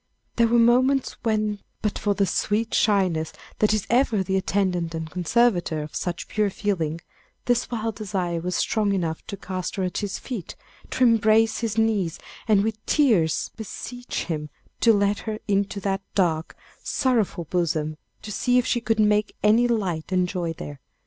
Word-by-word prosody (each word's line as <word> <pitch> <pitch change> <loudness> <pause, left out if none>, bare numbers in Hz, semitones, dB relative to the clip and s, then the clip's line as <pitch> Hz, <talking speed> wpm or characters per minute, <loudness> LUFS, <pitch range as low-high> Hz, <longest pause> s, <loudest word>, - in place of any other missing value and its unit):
There 235 -1 +5
were 235 +1 +3
moments 255 +3 +3
when 215 -2 0 0.2
but 210 - -1
for 205 -1 0
the 200 - +2
sweet 215 +5 0
shyness 185 -7 +2 0.3
that 215 - +4
is 215 -2 0
ever 235 -5 +2
the 190 +1 -1
attendant 185 -3 0
and 160 0 -4
conservator 180 -2 +1
of 150 - -9
such 175 -1 -3
pure 210 -1 +1
feeling, 170 -6 -2 0.4
this 245 0 +1
wild 225 -2 -3
desire 185 -5 -2
was 180 +1 -3
strong 210 -2 +1
enough 165 -4 -2
to 200 - -5
cast 185 -1 -4
her 190 - -1
at 180 - -2
his 205 -2 -3
feet, 235 -9 -6 0.3
to 260 - 0
embrace 225 -1 +4
his 225 -2 -2
knees, 210 -7 +1 0.3
and 205 -3 +4
with 220 0 -3
tears 215 - +2
beseech 245 +3 -5
him 150 -3 -4 0.3
to 230 - +5
let 200 -1 +2
her 215 -1 -4
into 200 0 0
that 195 0 -1
dark, 165 -4 +1 0.3
sorrowful 230 -9 0
bosom, 155 -2 -1 0.3
to 215 - -6
see 245 +4 +2
if 250 - +3
she 240 - 0
could 225 0 0
make 210 0 +2
any 225 +3 +5
light 190 -9 -1
and 180 -1 +2
joy 175 -2 -2
there. 145 -3 -8
205 Hz, 170 wpm, -24 LUFS, 180-225 Hz, 0.4 s, There